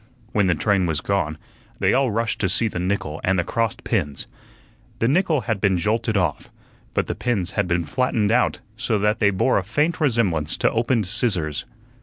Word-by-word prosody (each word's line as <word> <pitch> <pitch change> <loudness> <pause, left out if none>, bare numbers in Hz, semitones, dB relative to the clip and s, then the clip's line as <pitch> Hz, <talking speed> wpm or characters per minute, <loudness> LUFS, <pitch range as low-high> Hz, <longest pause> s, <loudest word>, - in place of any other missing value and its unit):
When 105 -4 +2
the 90 - +3
train 95 +3 +1
was 80 -2 0
gone, 80 -6 -1 0.4
they - - +2
all 135 -1 +3
rushed 115 +1 -1
to 95 - +1
see 105 +6 +1
the 95 - -4
nickel 90 -4 -2
and 95 +1 +2
the 90 - +2
crossed 115 +5 -2
pins. 75 -11 -1 0.7
The 115 - +1
nickel 160 0 +2
had 110 -5 -2
been 95 -3 +3
jolted 110 +4 0
off, 90 - -1 0.5
but - - +1
the - - -3
pins 105 -7 -1
had 105 -3 0
been 85 -1 +1
flattened 110 - 0
out 125 +2 +2
so 110 0 0
that 105 +2 +1
they 105 - +4
bore 100 +4 +2
a - - -4
faint 150 - 0
resemblance 105 - +1
to - - +2
opened 115 -1 +1
scissors. 95 - -1
105 Hz, 195 wpm, -22 LUFS, 90-115 Hz, 0.7 s, they